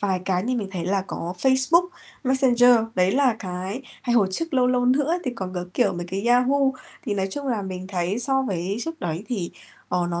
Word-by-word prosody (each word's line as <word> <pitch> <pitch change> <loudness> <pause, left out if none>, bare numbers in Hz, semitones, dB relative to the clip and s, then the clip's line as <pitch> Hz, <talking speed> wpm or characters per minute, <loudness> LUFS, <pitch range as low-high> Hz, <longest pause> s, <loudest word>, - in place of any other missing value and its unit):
vài 190 -3 0
cái 185 -1 0
như 250 +4 -1
mình 205 -4 -3
thấy 175 -3 -3
là 195 +1 +1
có 175 0 -5
Facebook, 265 - +3 0.4
Messenger. 250 -2 +4 0.2
Đấy 185 +1 +3
là 260 -5 +3
cái 185 +6 -5 0.2
hay 240 -1 0
hồi 200 -5 +4
trước, 330 - -2
lâu 255 -1 +4
lâu 250 0 +2
nữa 280 +5 +2
thì 255 - -1
còn 190 -4 -5
có, 180 0 -3
kiểu, - - +2
mấy 175 0 -5
cái 195 +5 -3
Yahoo. 250 +3 +4 0.5
Thì, 210 - -1
nói 195 -1 0
chung 280 +6 -5
là, 225 -5 -1
mình 185 -1 -6
thấy 185 +2 -1
so 265 +1 +1
với 190 -3 -2
trước 325 +5 -5
đấy 175 +2 -3
thì, 195 -9 -2 0.4
ờ, 180 -1 0
nó 170 - -2
210 Hz, 225 wpm, -24 LUFS, 185-255 Hz, 0.5 s, Messenger